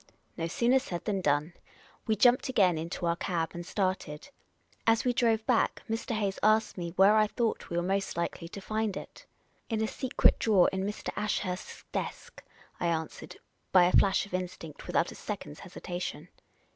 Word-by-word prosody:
No 165 Hz, -1 st, -2 dB
sooner 240 Hz, +9 st, +3 dB
said 180 Hz, -10 st, -6 dB
than 200 Hz, -3 st, 0 dB
done. 150 Hz, +1 st, +1 dB, 0.5 s
We 220 Hz, -, +3 dB
jumped 245 Hz, +5 st, +4 dB
again 195 Hz, -9 st, +4 dB
into 165 Hz, +2 st, -4 dB
our 170 Hz, 0 st, +2 dB
cab 165 Hz, -2 st, -1 dB
and 175 Hz, -, -5 dB
started. 185 Hz, -, -2 dB, 0.6 s
As 225 Hz, +1 st, +4 dB
we 250 Hz, -, +3 dB
drove 225 Hz, -2 st, +2 dB
back, 245 Hz, -3 st, +1 dB
Mr. 225 Hz, +1 st, -2 dB
Hayes 200 Hz, -3 st, -1 dB
asked 215 Hz, +1 st, +3 dB
me 175 Hz, -2 st, -4 dB
where 195 Hz, +3 st, +6 dB
I 215 Hz, -1 st, +5 dB
thought 230 Hz, +1 st, -2 dB
we 170 Hz, -, -2 dB
were 175 Hz, -, +1 dB
most 195 Hz, 0 st, -1 dB
likely 170 Hz, 0 st, -3 dB
to 200 Hz, -, -7 dB
find 215 Hz, 0 st, -2 dB
it. -, -, -10 dB, 0.2 s
" -, -, -40 dB
In 225 Hz, -2 st, 0 dB
a 220 Hz, -, +1 dB
secret 260 Hz, +3 st, +2 dB
drawer 205 Hz, -5 st, +4 dB
in 190 Hz, 0 st, -1 dB
Mr. 210 Hz, -, -4 dB
Ashurst's 205 Hz, -3 st, -3 dB
desk," -, -, -5 dB, 0.4 s
I 175 Hz, -, 0 dB
answered, 160 Hz, -2 st, -3 dB, 0.4 s
by 185 Hz, -2 st, +7 dB
a 175 Hz, -, +4 dB
flash 195 Hz, 0 st, +4 dB
of 200 Hz, -, -15 dB
instinct, 180 Hz, -4 st, -5 dB
without 170 Hz, -, +1 dB
a -, -, -8 dB
second's 150 Hz, -8 st, -6 dB
hesitation. 180 Hz, -1 st, -6 dB
190 Hz, 185 wpm, -30 LUFS, 175-220 Hz, 0.6 s, by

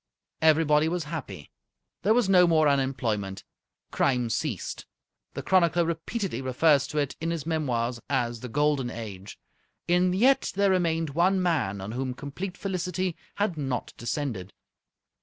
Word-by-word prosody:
Everybody 155 Hz, -1 st, +4 dB
was 175 Hz, 0 st, -2 dB
happy. 140 Hz, -, -7 dB, 0.5 s
There 215 Hz, +5 st, +3 dB
was 245 Hz, -5 st, +3 dB
no 180 Hz, -2 st, +6 dB
more 155 Hz, -2 st, +4 dB
unemployment. 120 Hz, -8 st, -1 dB, 0.5 s
Crime 125 Hz, -4 st, +1 dB
ceased. -, -, -3 dB, 0.5 s
The -, -, -4 dB
chronicler 175 Hz, -2 st, +3 dB
repeatedly 170 Hz, -, -3 dB
refers 140 Hz, +2 st, +3 dB
to 150 Hz, -, -6 dB
it 145 Hz, -2 st, 0 dB
in 165 Hz, -, -1 dB
his 165 Hz, -3 st, -3 dB
memoirs 125 Hz, -7 st, -1 dB
as 120 Hz, -4 st, 0 dB
the 125 Hz, -, -7 dB
Golden 145 Hz, -1 st, +1 dB
Age. 105 Hz, -4 st, -8 dB, 0.5 s
And 180 Hz, +1 st, +3 dB
yet 260 Hz, +7 st, +3 dB
there 200 Hz, 0 st, +3 dB
remained 165 Hz, -4 st, +1 dB
one 180 Hz, +5 st, +2 dB
man 155 Hz, -, 0 dB
on 100 Hz, +2 st, -5 dB
whom 130 Hz, +1 st, -3 dB
complete 175 Hz, +9 st, -6 dB
felicity 185 Hz, -2 st, -2 dB, 0.2 s
had 200 Hz, -5 st, -1 dB
not 135 Hz, -4 st, -3 dB
descended. 120 Hz, -, -4 dB
150 Hz, 140 wpm, -27 LUFS, 125-175 Hz, 0.5 s, no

